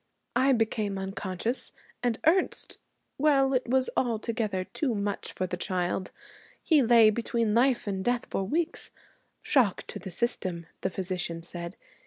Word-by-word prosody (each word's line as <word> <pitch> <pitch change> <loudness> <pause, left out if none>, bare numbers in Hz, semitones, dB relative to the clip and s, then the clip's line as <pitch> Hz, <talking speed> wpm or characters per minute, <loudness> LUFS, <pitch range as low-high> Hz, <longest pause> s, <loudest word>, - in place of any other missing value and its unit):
I 260 +2 +4
became 215 -4 0
unconscious, 190 +4 -3 0.3
and 240 -2 +1
Ernest 360 +4 +1 0.4
well, 275 -2 +4
it 255 -1 +1
was 260 0 +3
altogether 225 -4 0
too 250 +5 -2
much 200 0 -2
for 185 - -2
the 180 0 -4
child. 180 0 -1 0.5
He 310 -4 +5
lay 230 -3 +7
between 230 -1 0
life 245 +2 +3
and 195 -2 -2
death 245 +2 +1
for 195 - -1
weeks. 315 - -2 0.5
Shock 245 -9 +2
to - - -7
the 190 - -7
system, 180 -4 -2 0.2
the 190 - 0
physician 180 -3 -3
said. 170 +1 -7
220 Hz, 145 wpm, -28 LUFS, 190-245 Hz, 0.5 s, lay